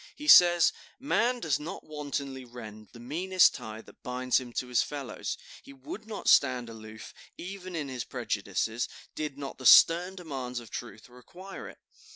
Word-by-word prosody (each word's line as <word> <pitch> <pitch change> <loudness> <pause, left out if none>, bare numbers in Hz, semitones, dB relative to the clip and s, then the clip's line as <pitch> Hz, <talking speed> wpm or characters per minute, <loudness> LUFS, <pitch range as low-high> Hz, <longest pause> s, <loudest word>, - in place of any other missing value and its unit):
He 300 - -8
says: 175 - +8 0.3
"Man 250 -2 +1
does 155 - 0
not 150 +3 -7
wantonly 140 -3 -5
rend 110 -3 -11
the 120 - -13
meanest 175 +9 +3
tie 110 0 -8
that - - -19
binds 125 0 0
him 125 -2 -9
to 125 - -2
his 125 -2 +2
fellows; 140 -4 -5 0.2
he 140 - -13
would 140 +11 -9
not 215 -2 -6
stand 125 -3 +4
aloof, 110 -1 -11 0.2
even 185 0 -7
in 150 -3 -3
his 130 -2 -4
prejudices, 110 -1 -2 0.2
did 150 -3 -4
not 140 -2 -7
the 130 - -9
stern 175 +3 +7
demands 135 -8 -5
of 115 -2 -13
truth 115 -3 -8
require 175 +11 -11
it. - - -14
135 Hz, 170 wpm, -29 LUFS, 120-175 Hz, 0.3 s, says